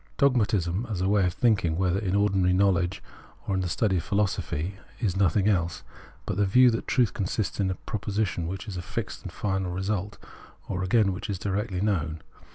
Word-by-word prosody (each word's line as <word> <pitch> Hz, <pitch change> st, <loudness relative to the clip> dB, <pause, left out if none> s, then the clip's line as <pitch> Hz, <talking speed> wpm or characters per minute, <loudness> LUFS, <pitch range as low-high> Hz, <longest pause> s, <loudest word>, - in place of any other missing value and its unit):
Dogmatism 110 Hz, -, +2 dB
as 100 Hz, -5 st, -2 dB
a 95 Hz, -, +1 dB
way 100 Hz, -2 st, +3 dB
of 90 Hz, -, -2 dB
thinking, 100 Hz, -9 st, +2 dB
whether 95 Hz, 0 st, +1 dB
in 100 Hz, -2 st, -1 dB
ordinary 95 Hz, -3 st, +3 dB
knowledge 95 Hz, -2 st, +2 dB, 0.4 s
or 100 Hz, -, 0 dB
in 95 Hz, -, +1 dB
the 90 Hz, -, -2 dB
study 95 Hz, +5 st, +1 dB
of 80 Hz, -, -2 dB
philosophy, 95 Hz, -3 st, -1 dB, 0.2 s
is 105 Hz, -7 st, 0 dB
nothing 95 Hz, +1 st, +2 dB
else 85 Hz, -5 st, 0 dB, 0.4 s
but -, -, -3 dB
the 105 Hz, -, +3 dB
view 125 Hz, +5 st, +6 dB
that 115 Hz, -, -3 dB
truth 125 Hz, -4 st, +2 dB
consists 100 Hz, +1 st, -2 dB
in 95 Hz, -2 st, +2 dB
a 95 Hz, -, -1 dB
proposition, 100 Hz, -4 st, -2 dB
which 95 Hz, +3 st, -5 dB
is 95 Hz, -3 st, -5 dB
a -, -, -3 dB
fixed -, -, -5 dB
and -, -, -7 dB
final 95 Hz, -2 st, -2 dB
result, 100 Hz, +2 st, -2 dB, 0.5 s
or 90 Hz, -, -2 dB
again 95 Hz, +1 st, +3 dB
which 95 Hz, +4 st, -6 dB
is 100 Hz, -, -1 dB
directly 100 Hz, 0 st, -2 dB
known. 80 Hz, -7 st, 0 dB
95 Hz, 195 wpm, -27 LUFS, 90-105 Hz, 0.5 s, view